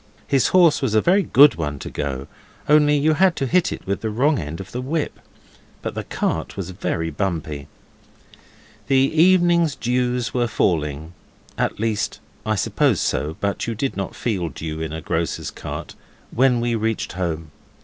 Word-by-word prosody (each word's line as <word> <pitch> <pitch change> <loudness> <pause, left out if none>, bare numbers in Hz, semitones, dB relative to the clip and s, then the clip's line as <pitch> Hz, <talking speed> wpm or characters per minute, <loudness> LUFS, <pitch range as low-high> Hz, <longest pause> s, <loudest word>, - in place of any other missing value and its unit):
His 135 -2 +3
horse 175 -5 +4
was 120 -6 0
a - - +6
very 190 - +4
good 145 -4 +6
one 75 -3 -3
to - - -7
go, 70 -2 -3 0.4
only 150 -1 +5
you 155 +2 +3
had 180 +2 +3
to 135 - -1
hit 175 +6 +2
it - - -7
with 100 +1 -2
the 110 - -2
wrong 135 +7 +2
end 75 0 -5
of 95 0 -8
the 125 - -4
whip. 150 +4 -2 0.6
But - - -3
the - - -4
cart - - -3
was 95 -2 -4
very 80 -3 -2
bumpety. 80 -5 -3 1.2
The 135 - +2
evening 170 +4 +4
dews 125 0 0
were 120 -1 +1
falling 80 -6 -1 0.4
at - - -1
least, 110 -1 -1 0.3
I 110 - +2
suppose 95 - +1
so, 75 +2 -1
but 100 +2 -1
you 115 - -2
do 135 +5 -1
not 95 -2 -4
feel 95 -8 -2
dew 80 +2 -6
in 80 -1 -3
a 80 +1 -5
grocer's - - -2
cart - - -7 0.4
when 125 -1 +3
we 120 0 0
reached 110 0 -1
home. 80 -4 -3
115 Hz, 175 wpm, -22 LUFS, -, 1.2 s, a